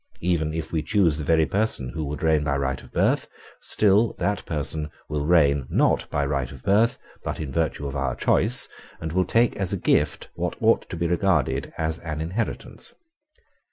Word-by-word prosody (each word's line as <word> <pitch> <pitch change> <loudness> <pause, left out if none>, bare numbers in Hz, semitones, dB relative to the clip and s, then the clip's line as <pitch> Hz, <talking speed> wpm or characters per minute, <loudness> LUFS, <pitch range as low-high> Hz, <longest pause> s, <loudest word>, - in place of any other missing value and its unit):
Even 85 -3 +1
if 80 0 -4
we 80 - 0
choose 80 -1 +2
the - - -3
very 80 +1 +3
person 100 - +1
who 80 +3 -4
would 75 +1 -5
reign 80 -2 +3
by 70 -2 0
right 65 -1 -2
of - - -16
birth, - - +1 0.3
still 105 +2 +3
that 100 0 -1
person 75 0 -2 0.2
will 75 -1 -2
reign 70 -6 +4
not - - +2
by 70 0 0
right 70 -3 -2
of 65 -2 -12
birth, 110 +5 +3 0.3
but - - -4
in 75 -4 -4
virtue 80 -2 -1
of 70 0 -4
our 70 -2 -1
choice, 120 +6 +2 0.3
and 80 0 -5
will 95 0 +2
take 115 0 +2
as 95 -3 -1
a - - 0
gift - - +1
what - - -3
ought - - +2
to - - -5
be 85 - -1
regarded 90 -3 +1
as 80 0 -1
an 75 -2 -5
inheritance. 90 +9 -4
80 Hz, 190 wpm, -24 LUFS, 70-90 Hz, 0.3 s, reign